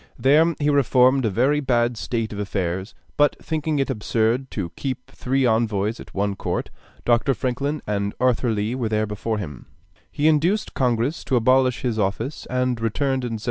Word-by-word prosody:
There 155 Hz, +5 st, +4 dB
he 150 Hz, 0 st, +2 dB
reformed 130 Hz, -1 st, +4 dB
a -, -, +2 dB
very 130 Hz, +9 st, +2 dB
bad 120 Hz, -3 st, +1 dB
state 115 Hz, -1 st, -3 dB
of 100 Hz, -, -6 dB
affairs; 95 Hz, -1 st, -3 dB, 0.2 s
but 145 Hz, 0 st, +4 dB
thinking 155 Hz, -1 st, -2 dB
it 135 Hz, -1 st, 0 dB
absurd 115 Hz, +3 st, 0 dB
to 90 Hz, -6 st, -4 dB
keep 130 Hz, -2 st, -5 dB
three 135 Hz, +1 st, 0 dB
envoys 110 Hz, -2 st, +1 dB
at -, -, -11 dB
one 100 Hz, 0 st, 0 dB
court -, -, -3 dB, 0.3 s
(Dr. 120 Hz, +3 st, +3 dB
Franklin 140 Hz, +6 st, -2 dB
and 100 Hz, -1 st, -2 dB
Arthur 125 Hz, -1 st, +2 dB
Lee 110 Hz, +1 st, -1 dB
were 125 Hz, -4 st, -2 dB
there 110 Hz, 0 st, +1 dB
before 105 Hz, +1 st, -3 dB
him), 75 Hz, -11 st, -7 dB, 0.4 s
he 150 Hz, +1 st, +1 dB
induced 165 Hz, +7 st, +2 dB
Congress 125 Hz, +3 st, 0 dB
to 130 Hz, -, +1 dB
abolish 130 Hz, +1 st, +3 dB
his 120 Hz, -3 st, -1 dB
office, 110 Hz, +8 st, -2 dB
and 125 Hz, -2 st, 0 dB
returned 130 Hz, +4 st, 0 dB
in 120 Hz, -2 st, -3 dB
1779. 110 Hz, -, -4 dB
120 Hz, 180 wpm, -23 LUFS, 110-135 Hz, 0.4 s, There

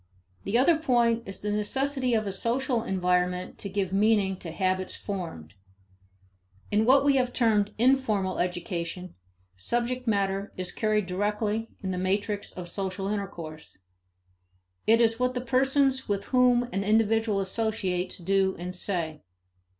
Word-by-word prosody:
The 200 Hz, +4 st, +1 dB
other 295 Hz, +6 st, +4 dB
point 240 Hz, -6 st, +2 dB
is 195 Hz, -, -7 dB
the 210 Hz, -, -2 dB
necessity 255 Hz, +4 st, 0 dB
of 215 Hz, -1 st, 0 dB
a 200 Hz, -, -2 dB
social 240 Hz, +4 st, 0 dB
environment 180 Hz, -2 st, 0 dB
to 200 Hz, -, -5 dB
give 190 Hz, -1 st, -2 dB
meaning 200 Hz, -1 st, +3 dB
to 175 Hz, -, -7 dB
habits 185 Hz, +2 st, -1 dB
formed. 165 Hz, -, -6 dB, 1.2 s
In 210 Hz, +1 st, +3 dB
what 270 Hz, +2 st, +6 dB
we 280 Hz, -1 st, +4 dB
have 250 Hz, -1 st, +1 dB
termed 210 Hz, -4 st, +2 dB
informal 220 Hz, -6 st, +2 dB
education, 175 Hz, 0 st, -3 dB, 0.4 s
subject 240 Hz, -, -2 dB
matter 200 Hz, -1 st, 0 dB
is 185 Hz, -1 st, -3 dB
carried 215 Hz, -2 st, 0 dB
directly 210 Hz, +4 st, -1 dB
in 190 Hz, -, -2 dB
the 180 Hz, -, -2 dB
matrix 200 Hz, +2 st, -1 dB
of 180 Hz, -1 st, -7 dB
social 195 Hz, +1 st, -3 dB
intercourse. 170 Hz, -7 st, -6 dB, 1.1 s
It 225 Hz, +1 st, +6 dB
is 230 Hz, 0 st, +3 dB
what 250 Hz, 0 st, +1 dB
the -, -, 0 dB
persons 265 Hz, +1 st, +2 dB
with 200 Hz, -1 st, 0 dB
whom 250 Hz, -1 st, +5 dB
an 195 Hz, -, 0 dB
individual 220 Hz, 0 st, +2 dB
associates 190 Hz, -3 st, -1 dB
do 190 Hz, +1 st, +1 dB
and 180 Hz, +1 st, -6 dB
say. 165 Hz, -5 st, -3 dB
205 Hz, 140 wpm, -27 LUFS, 185-235 Hz, 1.2 s, what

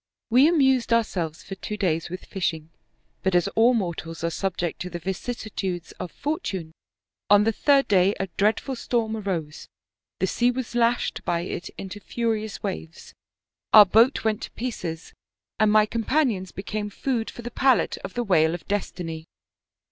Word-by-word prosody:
We 255 Hz, +5 st, +7 dB
amused 265 Hz, -7 st, +3 dB
ourselves 180 Hz, -9 st, 0 dB
for -, -, -7 dB
two 210 Hz, +2 st, -5 dB
days 170 Hz, -5 st, 0 dB
with 180 Hz, +2 st, -7 dB
fish 185 Hz, -4 st, -1 dB
ing, 160 Hz, 0 st, -13 dB, 0.5 s
but 190 Hz, -1 st, +1 dB
as 175 Hz, -, +3 dB
all 235 Hz, +3 st, +4 dB
mortals 165 Hz, -5 st, -3 dB
are 170 Hz, -, 0 dB
subject 175 Hz, -1 st, -2 dB
to 180 Hz, -, -4 dB
the 175 Hz, -, -5 dB
vicissitudes 190 Hz, -1 st, -4 dB
of 180 Hz, -, -5 dB
fortune, 205 Hz, -, -3 dB, 0.6 s
on 205 Hz, 0 st, +7 dB
the 225 Hz, -, +2 dB
third 275 Hz, +4 st, +3 dB
day 195 Hz, 0 st, +4 dB
a 195 Hz, -, 0 dB
dreadful 220 Hz, +6 st, +1 dB
storm 230 Hz, -2 st, -1 dB
arose, 180 Hz, -8 st, -4 dB, 0.5 s
the 190 Hz, -, +1 dB
sea 240 Hz, +6 st, +2 dB
was 250 Hz, -1 st, -3 dB
lashed 240 Hz, 0 st, +1 dB
by 170 Hz, -1 st, 0 dB
it 175 Hz, 0 st, -5 dB
into 195 Hz, +1 st, -7 dB
furious 220 Hz, -1 st, -3 dB
waves, 80 Hz, +1 st, -6 dB, 0.6 s
our 215 Hz, -1 st, +11 dB
boat 230 Hz, +7 st, +4 dB
went 220 Hz, -1 st, 0 dB
to -, -, -6 dB
pieces, 180 Hz, -9 st, -5 dB, 0.5 s
and 215 Hz, 0 st, +4 dB
my 215 Hz, 0 st, +6 dB
companions 225 Hz, -4 st, 0 dB
became 205 Hz, +1 st, -4 dB
food 230 Hz, +1 st, -2 dB
for 240 Hz, -, -10 dB
the 240 Hz, -, -6 dB
palate 260 Hz, 0 st, +2 dB
of 190 Hz, -, -8 dB
the 245 Hz, -, 0 dB
whale 165 Hz, -5 st, +3 dB
of 165 Hz, -, -11 dB
destiny. 175 Hz, -5 st, -3 dB
205 Hz, 165 wpm, -25 LUFS, 175-235 Hz, 0.6 s, our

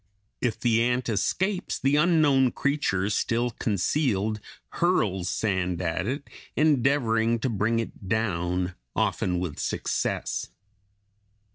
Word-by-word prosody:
If 115 Hz, -3 st, -1 dB
the 115 Hz, -1 st, +3 dB
ant 125 Hz, +1 st, +1 dB
escapes, 185 Hz, -, 0 dB
the 135 Hz, +2 st, +2 dB
unknown 150 Hz, -5 st, +4 dB
creature, 140 Hz, -10 st, 0 dB
still 120 Hz, +3 st, 0 dB
concealed, 110 Hz, -, 0 dB, 0.3 s
hurls 100 Hz, -, +1 dB
sand 95 Hz, -4 st, -1 dB
at 90 Hz, +2 st, -1 dB
it, 140 Hz, +3 st, -3 dB, 0.3 s
endeavoring 125 Hz, -6 st, +2 dB
to 130 Hz, -, 0 dB
bring 115 Hz, +1 st, +1 dB
it 115 Hz, -3 st, -5 dB
down, 90 Hz, -4 st, 0 dB, 0.2 s
often 90 Hz, -1 st, 0 dB
with 85 Hz, -5 st, -4 dB
success. -, -, -2 dB
115 Hz, 110 wpm, -26 LUFS, 95-135 Hz, 0.3 s, unknown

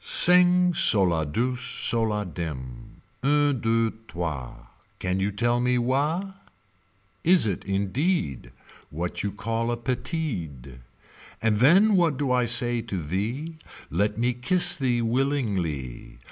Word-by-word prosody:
Sing 180 Hz, 0 st, +5 dB
so 105 Hz, -, +4 dB
la 85 Hz, -3 st, +1 dB
douse 125 Hz, -, -2 dB
so 120 Hz, -2 st, +1 dB
la 105 Hz, -2 st, -1 dB
dim. 75 Hz, -8 st, -8 dB, 0.2 s
Un 145 Hz, +1 st, +2 dB
deux 115 Hz, 0 st, +1 dB, 0.2 s
trois 75 Hz, -8 st, -6 dB, 0.3 s
Can 90 Hz, +1 st, -2 dB
you 95 Hz, +2 st, 0 dB
tell 120 Hz, +4 st, 0 dB
me 125 Hz, 0 st, +1 dB
wha 150 Hz, +10 st, -1 dB, 0.9 s
Is 175 Hz, -5 st, +5 dB
it 100 Hz, -5 st, -3 dB
indeed. 100 Hz, -, -2 dB, 0.4 s
What 85 Hz, +3 st, -4 dB
you 100 Hz, -, -2 dB
call 115 Hz, +3 st, -3 dB
a 120 Hz, -, -2 dB
Petide. 105 Hz, -, -4 dB, 0.6 s
And 110 Hz, -2 st, +1 dB
then 190 Hz, -, +5 dB
what 170 Hz, -6 st, +2 dB
do 140 Hz, -2 st, -1 dB
I 125 Hz, -1 st, +2 dB
say 120 Hz, 0 st, +3 dB
to 105 Hz, -4 st, -5 dB
thee 110 Hz, -, -4 dB, 0.3 s
Let 105 Hz, +6 st, -1 dB
me 120 Hz, +2 st, 0 dB
kiss 175 Hz, +9 st, +3 dB
thee 125 Hz, -6 st, 0 dB
willingly. 105 Hz, -, -2 dB
115 Hz, 130 wpm, -25 LUFS, 95-140 Hz, 0.9 s, Sing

